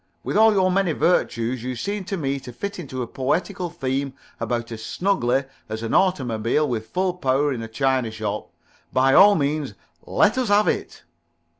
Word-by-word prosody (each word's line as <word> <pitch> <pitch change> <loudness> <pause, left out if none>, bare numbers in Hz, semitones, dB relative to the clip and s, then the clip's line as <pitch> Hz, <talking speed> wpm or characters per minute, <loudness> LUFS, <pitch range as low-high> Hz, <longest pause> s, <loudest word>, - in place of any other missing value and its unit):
With - - -3
all 220 +1 +6
your 190 -3 +2
many 185 -3 +1
virtues, 125 -8 +1
you 125 +1 -4
seem 200 - -3
to 195 - -3
me 140 -3 -2
to 125 - -10
fit 200 - -5
into 130 -6 -5
a - - -6
poetical 175 - -2
theme 135 -4 -2 0.3
about 120 -1 -2
as 110 -1 -7
snugly 140 - 0 0.3
as 110 +1 -4
an 115 - -3
automobile 130 - +1
with 110 -4 -3
full 185 0 0
power 145 -4 +1
on - - 0
in 120 - -5
a 115 - -5
china 130 0 0
shop. 105 -1 -4 0.4
By 135 +1 +3
all 205 +5 +8
means 145 - -1 0.3
let 215 +5 +3
us 255 - 0
have 205 +1 +4
it." - - -2
135 Hz, 185 wpm, -23 LUFS, 120-185 Hz, 0.4 s, all